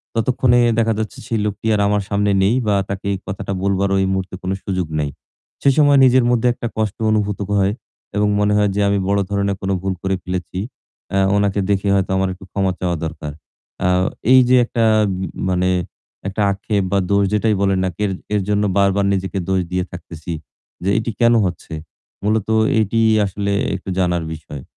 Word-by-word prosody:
ততক্ষণে 120 +2 +2 0.2
দেখা 115 0 +2
যাচ্ছে 110 -1 -4
সেই 115 - -1
লোকটি 105 +1 -4
আর 105 - +1
আমার 105 0 +1
সামনে 100 0 +1
নেই 105 +5 +3
বা 105 - +3
তাকে 100 0 -5
এই - - -2
কথাটা 95 +1 -4
বলবারও 100 0 +1
এই - - +1
মুহূর্তে 95 -1 -3
কোনো 95 +1 -1
সুযোগ 95 -3 -2
নেই। 75 -1 -1 0.5
সে - - +4
সময় 145 -2 +5
নিজের 130 -1 +4
মধ্যে 120 0 +2
একটা 120 - -5
কষ্ট 110 -3 -1
অনুভূত 105 -2 0
ক - - -15
হয় 100 +1 +2 0.4
এবং 105 0 +2
মনে 105 0 +2
হয় 105 -1 +3
যে 105 - +1
আমি 100 0 +1
বড় 100 0 +2
ধরনের 100 -1 0
কোনো 95 0 -1
ভুল 95 0 -1
করে 95 0 0
ফেলেছি। 90 0 -4 0.6
আ - - +3 0.2
উনাকে 100 0 +1
দেখে 100 0 +1
হয়তো 95 -1 0
আমার 95 0 +1
একটু 95 +1 -13
ক্ষমা 95 -2 0
চাওয়া 90 -2 -1
দরকার। 75 -2 -5 0.5
আ - - +4 0.5
এই 130 - +9
যে 130 - +6
একটা 115 0 -1 0.3
ব - - -5 0.3
মানে 90 0 +1 0.6
একটা 100 +2 -2
আক্ষেপ 100 +1 -1
বা 100 - +3
দোষ 100 0 +3
যেটাই 105 0 +2
বলেন 95 -1 +2
না 95 - 0
কের 105 -1 0 0.2
এর 105 - +2
জন্য 105 0 +2
বারবার 100 0 +3
নিজেকে 95 0 -2
দোষ 95 -1 +2
দিয়ে 90 0 0
থাকতেছি 85 -1 -7 0.5
যে 95 - 0
এটিই 115 -1 -2
কেনো 120 -1 +5
হচ্ছে? 85 -2 -5 0.5
মূলত 105 0 0 0.3
এটি 110 +2 +1 0.2
আসলে 100 +1 -2 0.2
একটু 95 +1 -7
জানার 90 -2 +1
বিষয়। 75 -3 -9
100 Hz, 190 wpm, -19 LUFS, 95-105 Hz, 0.6 s, এই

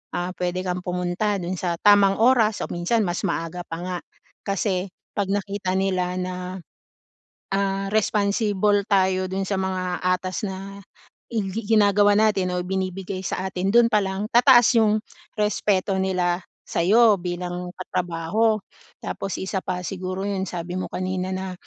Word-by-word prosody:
ah, 175 +1 -2
pwede 180 0 -2
kang 180 0 -2
pumunta 180 +3 -1
dun 180 +1 -3
sa 175 -2 -1
tamang 200 -1 +5
oras 225 -3 +4
o - - -3
minsan 175 +7 0
mas 175 0 -2
maaga 165 +2 -2
pa 165 - -5
nga. 180 +1 -3 0.5
Kasi 195 -1 -1 0.3
'pag 200 -2 -1
nakita 200 -1 -2
nila 185 -2 0
na, 185 0 -4 0.9
ah, 195 0 0
responsible 205 -1 +2
tayo 190 -2 +2
dun 190 +1 -2
sa 200 - 0
mga 185 -1 -2
atas 185 +2 0
na 195 +1 -7 0.5
i 225 -3 -1
gi 215 +1 -5
ginagawa 205 0 +5
natin 200 -4 +2
o 180 - 0
ibinibigay 190 0 -3
sa 185 0 -3
atin, 185 +1 -1
doon 235 +3 +4
pa 210 - +5
lang 190 +1 -2
tataas 240 -1 +6
yung 215 -1 +3 0.4
respeto 210 -2 +1
nila 180 -2 0 0.2
sa'yo 210 +3 +4
bilang 180 0 -4
katrabaho. 180 +5 0 0.5
Tapos 195 - -4
isa 190 0 -3
pa 180 -1 -4
siguro 185 +2 -4
yun, 195 -1 -2
sabi 175 0 -5
mo - - -4
kanina 185 0 -3
na 190 0 -4
190 Hz, 150 wpm, -23 LUFS, 180-205 Hz, 0.9 s, tataas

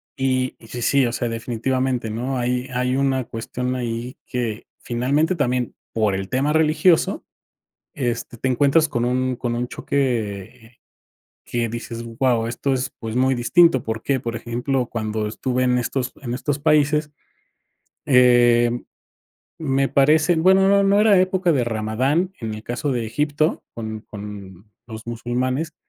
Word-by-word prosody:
y 130 -1 0
y 115 - -15
sí 120 +1 -6
sí, 135 +1 +3
o 120 - -1
sea, 120 0 -2
definitivamente, 120 +1 -1
¿no? 125 +4 -3
Hay 125 +1 -1
hay 125 +1 0
una 135 -2 +1
cuestión 125 +3 -4
ahí 120 +1 -4
que 120 -3 -3
finalmente, 140 +9 0
también 125 -5 -1 0.2
por 110 -3 +1
el 95 0 -4
tema 140 +4 +1
religioso, 160 +2 +3 0.7
este, 120 -3 -3
te 130 - -2
encuentras 145 +5 +3
con 120 -4 -2
un 130 0 0
con 120 -1 -3
un 120 +1 -2
choque 115 -4 -3 0.7
que 120 -1 -1
dices: 115 0 -6
"Guau 115 0 0
esto 130 +4 -2
es, 130 0 -2
pues, 115 0 -5
muy 130 0 +3
distinto", 130 +2 +4
¿por 110 0 -4
qué? 135 -2 0
Por 115 -1 -4
ejemplo, 125 +3 -2
cuando 110 -2 -2
estuve 125 +3 -1
en 125 0 +2
estos 125 +1 -2
en 120 -2 -4
estos 140 +2 -2
países, 150 0 +2 0.9
em, 120 -2 +4 0.7
me 135 -3 +1
parece, 155 +5 +4
bueno, 190 +3 +5
no 200 0 +5
no 200 +1 +4
era 210 -3 +5
época 185 -2 +2
de 130 -4 +2
Ramadán, 125 - 0
en 110 -2 -4
el 110 - -8
caso 125 +4 -2
de 120 -3 -1
Egipto, 150 +6 0
con 110 -1 -5
con 100 -1 -10
los 110 -1 -9
musulmanes. 125 +6 -2
125 Hz, 155 wpm, -22 LUFS, 115-140 Hz, 0.9 s, bueno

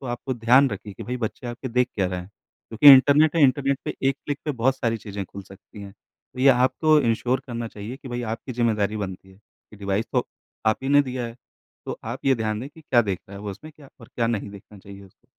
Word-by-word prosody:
तो 135 - -8
आपको 120 +2 -4
ध्यान 125 +4 +4
रखिए 100 0 -7
कि - - -9
भई, 125 +1 -4
बच्चे 120 +1 -5
आपके 120 +2 -6
देख 125 +1 +1
क्या 95 -3 0
रहे 90 0 -3
हैं। 90 - -11
क्योंकि 115 +6 +4
इंटरनेट 145 +4 +4
है, 160 - +4
इंटरनेट 140 0 +3
पे - - -3
एक 135 - 0
क्लिक 145 -1 -3
पे 155 - -1
बहुत 130 +1 +3
सारी 115 -3 -1
चीज़ें 100 -2 -6
खुल 100 +2 -10
सकती 95 +2 -15
हैं। 100 -1 -10 0.4
तो - - -12
ये 135 - +6
आपको 135 +5 +4
एंश्योर 120 +1 0
करना 120 -2 -5
चाहिए 110 +4 -8
कि 135 - -11
भई 120 0 -4
आपकी 115 +3 -5
ज़िम्मेदारी 110 -3 0
बनती 95 -2 -6
है, 95 - -17
ये 105 +1 -22
डिवाइस 100 +2 -1
तो - - +1 0.4
आप 110 - +3
ही 135 - -3
ने 145 +1 +5
दिया 130 -2 -4
है। 115 +1 -10 0.5
तो - - -5
आप - - -6
ये 135 -1 +4
ध्यान 110 -2 -2
दें 135 - -6
कि 160 - -17
क्या 125 -6 +3
देख 100 -4 -2
रहा 100 - -9
है 100 - -9
वो 105 - -4
उसमें, 155 +11 -11
क्या 145 -3 -15
और 115 - -14
क्या 115 - 0
नहीं 110 -3 -2
देखना 100 +1 -13
चाहिए 100 +1 -12
उसको। 95 - -23
120 Hz, 255 wpm, -24 LUFS, 105-130 Hz, 0.5 s, ये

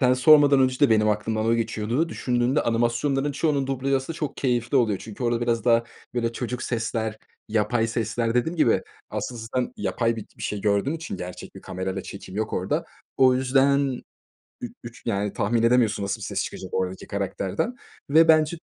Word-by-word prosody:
Sen 125 -2 +4
sormadan 145 +1 +6
önce 130 +1 +1
de 145 - +5
benim 110 -1 +4
aklımdan 110 +1 0
o 115 - +3
geçiyordu. 115 +6 -1
Düşündüğünde 125 0 0
animasyonların 120 +5 0
çoğunun 145 -2 0
dublajı 135 0 0
aslında 135 +5 -4
çok 150 -4 -4
keyifli 120 0 0
oluyor. 110 -6 +2
Çünkü 110 +2 -9
orada 120 0 +1
biraz 120 -1 0
daha, 115 -1 +4 0.3
böyle, 115 -1 0
çocuk 125 +1 -4
sesler, 110 -2 -2 0.3
yapay 110 +2 +1
sesler, 115 +1 -1
dediğim 160 +8 0
gibi, 125 -8 +3 0.3
aslında 120 -2 -4
sen 125 -1 0
yapay 115 -1 0
bi 110 - -6
bir - - -9
şey 105 - -3
gördüğün 105 +7 +1
için 160 0 -5
gerçek 90 0 -8
bir - - -10
kamerayla 95 0 -4
çekim 95 -1 -9
yok 110 0 -2
orada. 150 - -1 0.3
O 130 -1 +5
yüzden 135 0 +2 0.6
üç 120 - -5
üç, 120 0 -10
yani, 105 -2 -1
tahmin 115 +2 0
edemiyorsun 115 -4 +3
nasıl 100 - -3
bir - - -4
ses - - -2
çıkacak 95 - -7
oradaki 95 0 -2
karakterden 100 - -2 0.3
ve 160 +3 +6
bence 155 +1 +4
120 Hz, 180 wpm, -24 LUFS, 110-135 Hz, 0.6 s, sormadan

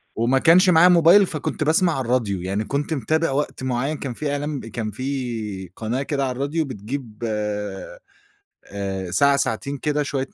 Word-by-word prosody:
وما 125 +4 +2
كانش 180 +5 +6
معايا 175 0 +7
موبايل، 175 +3 +6
فكنت 155 -2 -3
باسمَع 165 +3 +3
على 130 - -2
الراديو. 110 -7 0
يعني 100 +4 -2
كنت 145 +6 -2
متابع 160 +2 0
وقت 140 -1 -2
معين، 130 +4 -1
كان 130 -4 -5
في 145 +3 -3
إعلان 145 0 -3
كان 110 -1 -5
في 115 -7 -4
قناة 115 +4 -2
كده 140 -1 -2
على 130 - -2
الراديو، 145 +5 -1
بتجيب 120 -1 -7
آآ 105 - -5 0.9
ساعة 140 +10 +4
ساعتين 140 +1 -2
كده، 150 +1 0
شوية 135 -2 -3
135 Hz, 165 wpm, -22 LUFS, 115-150 Hz, 0.9 s, معايا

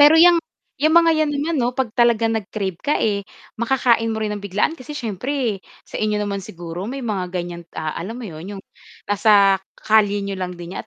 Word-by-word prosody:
Pero 295 +2 +8
'yang, 345 +1 +8 0.4
'yang 310 +2 +4
mga 335 -1 +7
yan 310 -1 +1
naman, 295 +4 -1
'no, 245 +1 -1
pag 255 -5 -1
talaga 235 -1 +3
nag-crave 205 -4 -2
ka, 295 - +1
eh, 205 -2 +1 0.4
makakain 235 -2 +2
mo - - -3
rin 215 -1 -1
ng 205 - -4
biglaan, 200 - +1
kasi 295 -1 -8
syempre 235 -1 -2 0.2
sa - - -6
inyo 215 -1 +1
naman 205 -1 -2
siguro 175 +1 -7
may 265 +1 -5
mga 195 -5 -2
ganyan, 175 -1 -5
ah, 155 -1 -2
alam 200 +7 -5
mo 250 - -7
yun 185 +2 -7
yung 195 - -9 0.5
nasa 200 -2 +5 0.2
kalye 210 -2 +3
n'yo 200 -1 -4
lang 180 0 -3
din 175 0 -8
niya - - -4
215 Hz, 205 wpm, -21 LUFS, 195-255 Hz, 0.5 s, Pero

